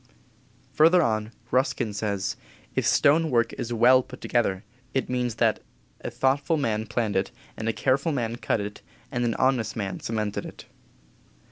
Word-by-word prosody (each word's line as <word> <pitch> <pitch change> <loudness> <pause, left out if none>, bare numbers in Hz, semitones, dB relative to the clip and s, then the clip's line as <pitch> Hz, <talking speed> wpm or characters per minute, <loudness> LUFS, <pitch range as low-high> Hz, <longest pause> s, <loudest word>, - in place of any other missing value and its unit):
Further 165 +3 +5
on 110 -2 -1 0.2
Ruskin 125 -4 +1
says: 100 -2 -2 0.4
"If - - 0
stone 160 +3 +4
work 120 -3 +2
is 120 - -5
well 120 +3 +6
put - - -12
together, 100 -6 0 0.3
it 135 - 0
means 125 -2 -1
that 115 -3 +2 0.4
a - - -5
thoughtful 140 +5 +1
man 110 -6 -1
planned 110 -2 -1
it, 95 - +1 0.3
and 110 0 -3
a - - +3
careful 135 +8 +1
man 120 -4 -2
cut 115 - 0
it, 105 0 -6 0.3
and 120 - -1
an 115 - 0
honest 125 -5 +1
man 100 -3 -3
cemented 110 -2 -2
it." - - -10
120 Hz, 160 wpm, -26 LUFS, 110-130 Hz, 0.4 s, well